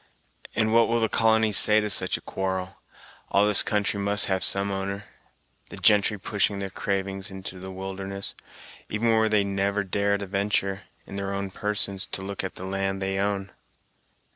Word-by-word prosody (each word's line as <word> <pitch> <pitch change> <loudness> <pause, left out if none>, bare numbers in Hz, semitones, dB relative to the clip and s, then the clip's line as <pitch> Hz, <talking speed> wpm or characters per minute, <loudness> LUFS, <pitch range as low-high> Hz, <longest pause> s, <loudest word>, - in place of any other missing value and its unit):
"And 110 0 +1
what 115 0 +5
will 115 +1 +1
the 110 - +1
colony 110 0 +2
say 105 +1 +7
to 105 - -2
such - - +3
a - - -13
quarrel 95 0 -4 0.5
all 100 +1 +3
this 105 -1 +7
country 105 -1 -1
must 100 +1 +2
have 95 -1 0
some 100 0 +5
owner, 100 +1 -4 0.6
the - - -10
gentry 105 0 +3
pushing 100 0 -1
their 100 -1 -5
cravings 95 0 -3
into 95 -1 -8
the 95 +1 -8
wilderness, 95 +1 -6 0.6
even 110 +2 0
where 110 -1 +3
they 105 -2 +2
never 100 +1 -1
dare 100 +1 0
to 100 - -6
ventur', 100 0 -1 0.2
in 100 - -8
their 100 0 -3
own 100 -1 -4
persons, 100 -1 -2
to 95 - -4
look 100 0 -4
at 95 - -5
the 95 - -8
land 95 0 -2
they 95 0 -2
own." 100 -1 -2
100 Hz, 180 wpm, -25 LUFS, 95-105 Hz, 0.6 s, say